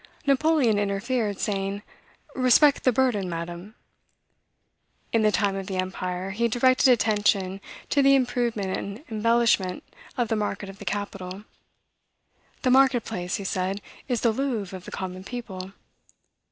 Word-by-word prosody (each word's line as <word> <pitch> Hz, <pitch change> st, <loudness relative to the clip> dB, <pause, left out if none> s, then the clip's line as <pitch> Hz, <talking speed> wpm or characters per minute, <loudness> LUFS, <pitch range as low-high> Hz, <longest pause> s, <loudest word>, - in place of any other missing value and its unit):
Napoleon 275 Hz, -5 st, +3 dB
interfered, 205 Hz, +1 st, -1 dB
saying, 200 Hz, 0 st, -2 dB, 0.5 s
'Respect 265 Hz, +3 st, +4 dB
the 255 Hz, -, +6 dB
burden, 230 Hz, -7 st, +1 dB
Madam.'" 175 Hz, +5 st, -6 dB, 1.4 s
In 230 Hz, -, +3 dB
the 215 Hz, -1 st, +4 dB
time 200 Hz, -2 st, +1 dB
of 195 Hz, -1 st, -5 dB
the 190 Hz, -, -3 dB
empire, 185 Hz, 0 st, -3 dB
he 235 Hz, +4 st, +1 dB
directed 255 Hz, +3 st, +3 dB
attention 205 Hz, -5 st, +2 dB, 0.3 s
to 285 Hz, -, +4 dB
the 275 Hz, 0 st, +6 dB
improvement 235 Hz, -7 st, 0 dB
and 200 Hz, +7 st, -6 dB
embellishment 220 Hz, -4 st, +2 dB, 0.3 s
of 240 Hz, -2 st, +1 dB
the 225 Hz, -, 0 dB
market 205 Hz, -1 st, -3 dB
of 195 Hz, -, -11 dB
the 205 Hz, -, -9 dB
capital. 195 Hz, 0 st, -4 dB, 1.2 s
"The 255 Hz, -, +3 dB
market 260 Hz, -2 st, +4 dB
place," 180 Hz, 0 st, -3 dB
he 200 Hz, -, -4 dB
said, 190 Hz, +1 st, -2 dB, 0.3 s
"is 245 Hz, -4 st, -1 dB
the 230 Hz, -, +3 dB
Louvre 220 Hz, -6 st, -2 dB
of 185 Hz, -, -10 dB
the -, -, -9 dB
common 185 Hz, 0 st, -5 dB
people." 195 Hz, -5 st, -7 dB
210 Hz, 140 wpm, -25 LUFS, 190-245 Hz, 1.4 s, the